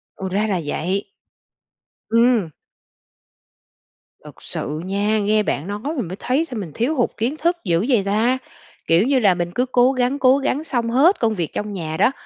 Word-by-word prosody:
Ồ, 190 - -5
ra 205 +4 0
là 195 -4 0
vậy. 185 +7 -2 1.0
Ừm. 230 -5 +3 1.8
Thực - - -13
sự 150 +2 -4
nha, 205 +3 0
nghe 210 +1 +2
bạn 160 -4 -2
nói 205 +1 -4 0.2
mình 245 - -2
mới 180 - -6
thấy 275 +6 0
sao 250 -7 -7
mình 180 -6 -6
thiếu 250 +8 0
hụt 245 - +1
kiến 240 +6 -1
thức 340 +3 +1
dữ 175 +1 +1
vậy 235 -7 +3
ta. 220 +6 +2 0.5
Kiểu 170 +7 +4
như 275 -1 +3
là 200 -6 +4
mình 175 -1 -3
cứ 250 - +1
cố 255 0 +3
gắng, 255 +1 0
cố 260 0 +5
gắng 280 +1 -1
xong 240 -7 -1
hết 285 - +4
công 225 -2 +1
việc 170 -6 -3
trong 210 0 -4
nhà 160 -4 -4
đó, - - +4
220 Hz, 190 wpm, -21 LUFS, 190-255 Hz, 1.8 s, cố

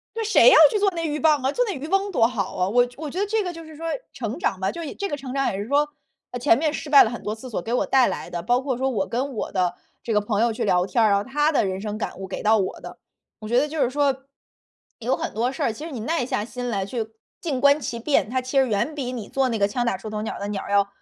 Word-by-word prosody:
那 455 - -2
谁 445 +3 +6
要 - - +7
去 435 - 0
做 400 -1 +3
那 330 -1 -2
鹬 300 0 -2
蚌 300 -4 +3
啊， 270 - +1
做 - - +1
那 410 - -2
渔 275 0 -6
翁 390 +3 +1
多 230 -9 +4
好 215 -6 -3
啊， 180 0 +1
我 245 +4 +4
觉 245 - -16
我 310 - -4
觉 350 - -5
得 405 - +1
这 440 +1 0
个 360 -2 -4
就 330 -1 -10
是 315 -1 -12
说 330 +2 -6 0.3
成 235 +2 -4
长 195 - -1
吧， 190 - 0
就 340 - -6
一 295 - -6
这 400 - -3
个 290 - -3
成 270 -2 -7
长 275 0 0
也 - - -4
是 205 - -4
说， 290 +4 +2 0.4
啊， 245 - -5
前 240 -2 +4
面 305 0 +1
失 305 -1 -6
败 285 - +9
了 220 - 0
很 240 - -7
多 210 - -3
次 225 +4 -10
所 215 -7 -3
给 225 - -5
我 250 - +1
带 260 -2 +4
来 - - -4
的， 170 -1 -4
包 245 +6 +2
括 265 -2 -2
说 265 +2 0
我 205 -6 -1
跟 265 +4 -2
我 215 - -3
的 180 -2 0 0.3
这 230 - -3
个 210 - +3
朋 205 0 -1
友 235 0 +2
去 220 - -3
聊 180 0 +3
天 225 +5 +1
儿 - - +5
啊， - - +3
然 200 - +4
后 200 - -3
他 295 +5 +1
的 295 - +2
人 190 -1 -2
生 210 0 -4
感 215 - -5
悟 190 0 -7
给 185 - -5
到 220 +1 +4
我 190 - -2
的， - - -10 0.4
我 215 - -8
觉 240 +2 +3
得 285 - +3
就 305 +1 -4
是 250 - +3
说， 280 +1 +1 0.8
有 245 +2 0
很 - - -4
多 235 +4 0
事 270 - -5
儿， 230 - +1
其 260 +8 -8
实 - - -7
你 255 -6 -6
耐 250 +2 -1
下 210 -4 -1
心 245 +1 -5
来 200 -5 -1
去 220 +2 -4 0.3
静 305 -7 -2
观 285 +2 +5
其 260 -4 -4
变， 275 -1 +1
它 255 +3 0
其 255 +2 -1
实 265 -1 +4
远 225 +8 0
比 260 -4 -4
你 230 -5 -6
做 270 -1 +1
那 230 -3 -1
个 200 - +3
枪 240 +4 -2
打 235 - +1
出 215 +3 -8
头 210 0 -3
鸟 220 - -4
儿 - - -8
的 200 - -3
鸟 205 -2 -3
儿， - - -9
呃 - - -4
要 200 0 +4
250 Hz, 355 characters per minute, -23 LUFS, 215-290 Hz, 0.8 s, 败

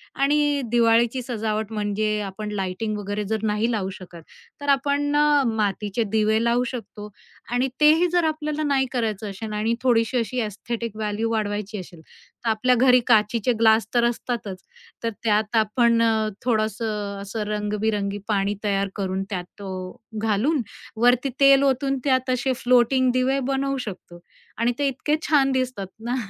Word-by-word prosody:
आणि 290 0 +2
दिवाळीची 235 +1 +3
सजावट 220 -3 -3
म्हणजे 210 0 -1
आपण 210 +2 -5
लाइटिंग 210 +2 -3
वगैरे 205 +1 -3
जर 220 +1 -2
नाही 215 +2 0
लावू 195 -4 -1
शकत, 175 -3 -11 0.4
तर 285 - -3
आपण 285 +1 +1
अ, 295 -1 +4
मातीचे 210 0 -1
दिवे 220 +1 +2
लावू 235 +1 +2
शकतो 215 -4 -7 0.4
आणि 245 +2 +1
तेही 320 +4 +6
जर 350 -1 +2
आपल्याला 310 -1 -2
नाही 275 -3 +2
करायचं 220 -4 -2
असेल 210 +2 -6
आणि 215 +2 0
थोडीशी 235 0 +2
अशी 240 +1 -2
एस्थेटिक 225 +1 -5
व्हॅल्यू 215 +1 -2
वाढवायची 210 -1 -2
असेल, 175 -2 -11
तर 225 +7 -9
आपल्या 250 +3 +2
घरी 250 +1 +5
काचेचे 225 +1 +3
ग्लास 220 0 +4
तर 240 - +3
असतातच, 235 -5 -3 0.4
तर 230 - +1
त्यात 215 0 +1
आपण 230 +2 +3
अ, 220 -1 +2 0.2
थोडंसं 215 -3 -1
असं 210 +2 -4
रंगबिरंगी 210 -1 -1
पाणी 205 -1 0
तयार 200 -1 0
करून, 190 -1 -2
त्यात 180 -4 -4
तो 195 -1 -7 0.5
घालून, 225 +7 +1 0.3
वरती 245 +3 +3
तेल 275 0 +6
ओतून, 270 0 +1
त्यात 260 -2 +1
असे 255 +1 +1
फ्लोटिंग 250 +1 +4
दिवे 255 +2 +1
बनवू 275 0 -1
शकतो 180 -3 -9 0.4
आणि 235 +2 +2
ते 285 - +2
इतके 275 +3 0
छान 275 -3 +4
दिसतात 255 -7 -2 0.2
ना 245 +1 -1
225 Hz, 155 wpm, -23 LUFS, 210-255 Hz, 0.5 s, तेही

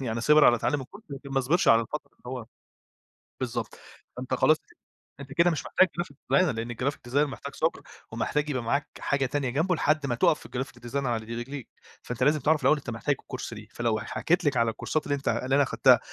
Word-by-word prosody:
يعني 115 -3 -2
صِبر 150 +4 +6
على 120 - +6
تعلّم 145 +5 0
الكورس 205 - -11
لكن 140 0 -8
ما 135 - +2
صبِِرش 150 +8 +2
على 115 0 +7
الفترة 140 +4 -6
اللي - - -34
هو 125 -3 -5 0.9
بالضبط. 120 -3 -4 0.4
فأنت 130 +1 -4
خلاص 155 +4 +4
ك - - -26 0.4
أنت 135 0 -8
كده 170 +3 +4
مش 160 - -3
محتاج 185 - +4
graphic 175 0 -4
designer 180 +4 +2
لأن 115 +2 -3
الgraphic 125 0 -3
designer 135 - 0
محتاج 140 +1 -8
صبر. 160 - 0 0.3
ومحتاج 145 +6 -1
يبقى 130 -4 -1
معاك 140 +5 0
حاجة 140 -1 0
تانية 135 0 -1
جنبُه 165 +8 +1
لحدّ 150 -2 +1
ما 120 - 0
تقف 135 - +3
في - - -13
graphic 125 -1 -5
design 135 - -9
على 115 -2 -1
ر - - -15
رجليك 130 +1 -6 0.4
فأنت 125 0 -3
لازم 150 +3 +4
تعرف 150 +2 +2
الأول 135 +3 +4
أنت 140 - -7
محتاج 120 +5 -1
الكورس 130 -2 -6
ليه؟ 105 -1 -10
فلو 115 -2 0
ح - - -6
حكيِت 175 +1 0
لِك 140 -3 +2
على 115 -1 +3
الكورسات 155 +7 -2
اللي 145 - +1
أنت 140 - -7
اللي 130 +2 +1
أنا 145 - +5
خدّتها - - +5
135 Hz, 225 wpm, -27 LUFS, 120-150 Hz, 0.9 s, على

